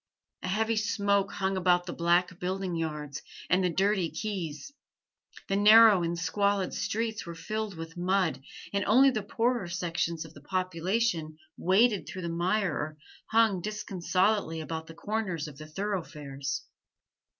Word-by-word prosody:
A - - -4
heavy 220 +4 +1
smoke 200 -2 +1
hung 195 0 -1
about 180 -1 +3
the 175 - -5
black 175 +1 +1
building 185 0 -2
yards 150 -3 -4 0.3
and 185 +1 +4
the 180 - +2
dirty 190 0 +1
quays; 190 - -5 0.7
the 195 - 0
narrow 210 -1 +8
and 170 0 -1
squalid 200 +2 0
streets 220 0 -2
were 170 - -6
filled 215 +3 -4
with 165 0 -7
mud, 180 -6 +1 0.3
and 200 0 +1
only 265 +6 +6
the 220 -4 -2
poorer 230 0 0
sections 170 -2 -2
of 160 - -13
the 145 - -14
population 185 -1 -1 0.2
waded 200 +3 +3
through 185 - -6
the 170 - -2
mire 180 +2 0
or 150 +1 -4 0.3
hung 220 -5 +3
disconsolately 195 -2 0
about 160 0 -5
the 165 - -11
corners 185 -5 -2
of 145 -1 -11
the 155 - -9
thorough 195 +3 -2
fares. 140 -3 -5
185 Hz, 150 wpm, -29 LUFS, 165-210 Hz, 0.7 s, narrow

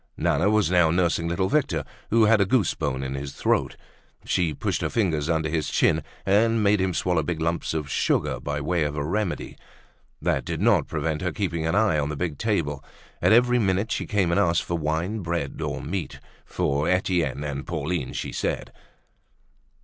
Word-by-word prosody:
Nana 85 +8 +2
was 105 -3 +2
now 90 -3 +4
nursing 85 -1 +1
little 85 +3 0
Victor, 95 - +1 0.3
who 115 0 +4
had 110 -1 +5
a - - +4
goose 120 -1 +2
bone 65 +1 -2
in 65 0 -3
his 70 0 -5
throat. - - 0 0.5
She 85 -4 +1
pushed 70 - -2
her - - -1
fingers 80 -9 0
under 80 -1 +1
his 80 -1 -1
chin, - - +2 0.2
and 110 +3 +3
made 100 -1 +3
him 95 -2 0
swallow 90 -3 +1
big 80 +2 -3
lumps 80 0 -1
of 75 -2 -2
sugar - - 0
by 75 0 -3
way 85 +3 0
of 75 -1 -1
a 70 - -2
remedy. 100 +2 -2 0.6
That - - 0
did - - -4
not - - +3
prevent 80 -2 -2
her 90 -1 -1
keeping 85 -5 -2
an 80 - 0
eye 105 -7 +3
on 70 0 -1
the 75 - -3
big 80 -4 -3
table. 75 -11 -1 0.4
At - - +4
every 125 +2 +5
minute 100 +1 0
she - - -2
came 100 -5 +1
and 85 - +2
asked 85 -4 +2
for 85 - -3
wine, 80 +7 -1
bread, 85 -6 -3
or - - -3
meat, 85 -2 -4 0.3
for 70 +4 0
Etienne 90 -6 0
and 70 -1 -4
Pauline, 85 -2 -2
she - - -4
said. - - -3
85 Hz, 195 wpm, -25 LUFS, 75-100 Hz, 0.6 s, had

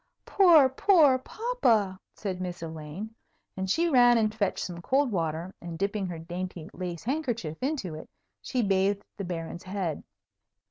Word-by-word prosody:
"Poor, 340 -8 +6
poor 285 -1 +4
papa," 240 - 0 0.2
said 185 -3 -4
Miss 180 -2 -5
Elaine. 160 +7 -7 0.4
And 190 0 -3
she 335 - +2
ran 245 -5 +6
and 215 -1 +1
fetched 205 -4 -1
some 175 -2 -7
cold 265 +6 +1
water, 165 0 -2
and, 170 -1 -6
dipping 200 +1 -1
her 175 -2 -5
dainty 175 0 -6
lace 175 -3 -5
handkerchief 235 - -2
into 260 - -2
it, 155 - -9 0.3
she 250 -3 -1
bathed 200 0 +1
the 200 - -4
Baron's 170 -1 -5
head. 185 -5 -3
195 Hz, 150 wpm, -28 LUFS, 175-255 Hz, 0.4 s, Poor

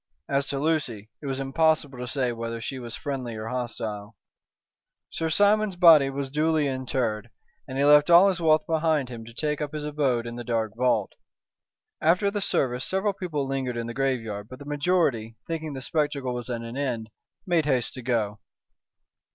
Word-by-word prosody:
As 140 0 0
to 140 - -2
Lucy, 135 -9 -1
it 145 - -6
was 135 0 -2
impossible 145 -1 +1
to 125 - -4
say 130 -1 0
whether 115 0 -4
she 130 +3 -5
was 120 -2 -6
friendly 130 -6 -4
or 110 +1 -5
hostile. 115 -4 -4 1.0
Sir 165 -1 -2
Simon's 205 +3 +3
body 165 -6 +7
was 135 0 -4
duly 155 0 +2
interred, 125 -4 -2 0.4
and 130 - -5
he 140 - +3
left 150 +2 +6
all 175 +3 +8
his 190 -3 0
wealth 155 -1 +4
behind 155 -4 +1
him 115 -2 -7
to 115 - -11
take 150 +5 -2
up 150 0 -3
his 150 -1 -4
abode 140 -6 0
in 120 0 -6
the 120 - -5
dark 115 -2 -1
vault. 120 -4 +1 0.9
After 180 +5 +3
the 205 0 -2
service 125 -8 0
several 195 +2 0
people 155 -8 -3
lingered 130 -3 -2
in 115 - -2
the 120 - -5
graveyard, 115 -6 -2
but 130 - -9
the 145 - -11
majority, 145 -7 0
thinking 160 -2 -4
the 130 -1 -6
spectacle 145 -5 -1
was 120 0 -5
at 120 -2 -3
an 115 +1 -7
end, 120 -6 -3 0.3
made 170 -5 +2
haste 130 -5 0
to 130 - -7
go. 110 -4 -1
135 Hz, 185 wpm, -26 LUFS, 120-155 Hz, 1.0 s, all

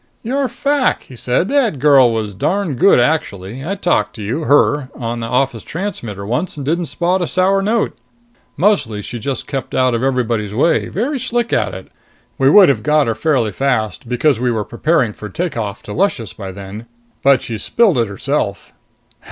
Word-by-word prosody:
"Your 265 +4 0
fac," 280 +2 0
he 130 - -13
said. 125 +9 0
"The 275 -2 +2
girl 135 -3 +5
was 110 -2 -3
darn 185 - -1
good 180 +3 +4
actually. 120 -4 -1
I 190 +6 -2
talked 180 -3 0
to 110 - -7
you 130 +10 -3
her 145 -1 +3
on 120 -1 -4
office 125 0 0
transmitter 120 - -5
once 130 - -2
and 140 - -5
didn't 165 +3 0
spot 180 +4 0
a 175 - 0
sour 190 +2 +2
note. 220 +3 0 0.6
Mostly 140 - +1
she 120 - -6
just 135 +3 -3
kept 135 -2 -5
out 130 -1 +2
of 115 - -1
everybody's 120 -6 -1
way. 165 +7 +2
Very 260 +8 -2
slick 240 0 -1
at 100 -3 0
it! 95 - -10 0.5
We 135 0 +5
would 195 +5 +8
have 130 -6 +2
got 150 +1 +3
her 115 - 0
fairly 120 -3 0
fast 110 -2 -1
because 125 +1 +2
we 125 0 +1
were 110 -3 -1
preparing 125 -3 0
for 105 - -8
take 170 - -3
off 105 -3 -4
to 105 - -7
Luscious 140 - -1
by 95 -1 -7
then. 100 +4 -9 0.3
But 135 -2 +4
she 115 -2 -5
spilled 205 - +2
it 115 - +1
herself." 100 -1 -3
135 Hz, 185 wpm, -17 LUFS, 115-175 Hz, 0.6 s, would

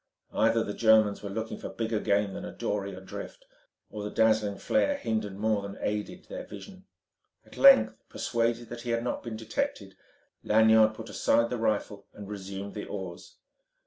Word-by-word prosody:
Either 115 0 +3
the 105 - -4
Germans 110 -2 +4
were 100 - -5
looking 110 +3 -4
for - - -6
bigger 115 -1 -2
game 100 -1 +1
than - - -6
a - - -6
dory 100 -1 -3
adrift, 95 - -9 0.5
or 105 - -6
the 105 - -4
dazzling 110 -2 +2
flare 280 +1 +1
hindered 110 - -2
more 110 0 +1
than 100 0 -7
aided 105 0 -3
their - - -7
vision. 190 -1 -11 0.6
At - - -16
length 270 - +7 0.2
persuaded 115 0 -1
that 120 0 -7
he 120 - -6
had 115 0 0
not 125 - -2
been 115 -2 -6
detected, 110 0 -3 0.5
Lanyard 110 0 +5
put 115 0 -8
aside 115 0 +2
the 125 - -1
rifle 105 -2 -1
and 100 -1 -9
resumed 100 0 -6
the 105 - -5
oars. 95 -4 -7
110 Hz, 175 wpm, -28 LUFS, 100-115 Hz, 0.6 s, length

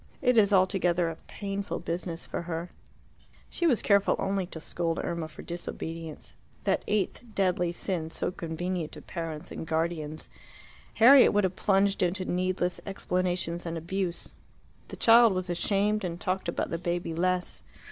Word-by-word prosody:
It 250 - +3
is 210 -3 +5
altogether 180 -3 +3
a - - -7
painful 200 0 -4
business 170 0 -4
for - - -4
her." 170 0 -4 0.8
She 345 - +1
was 250 -8 +2
careful 200 -1 +4
only 195 -2 -1
to 165 - -8
scold 165 +1 -2
Irma 170 -2 -2
for 155 - -11
disobedience 165 -2 -6 0.3
that - - +1
eighth 210 -2 0
deadly 180 -3 +1
sin, 170 -2 -3
so 165 - -1
convenient 170 0 -3
to - - -9
parents 165 -3 -5
and 160 - -6
guardians. 160 -1 -2 0.7
Harriet 260 +4 +8
would 205 0 +3
have 185 -1 0
plunged 195 0 +2
into 185 +1 0
needless 180 0 -1
explanations 180 -3 -1
and 165 -1 -4
abuse. 175 +1 -3 0.5
The - - -9
child 230 -2 +7
was 185 -1 -2
ashamed, 205 +4 +1
and 175 -1 -3
talked 185 -2 -1
about - - -2
the 165 - -2
baby 175 -1 -2
less. 180 +2 0
180 Hz, 155 wpm, -28 LUFS, 170-195 Hz, 0.8 s, Harriet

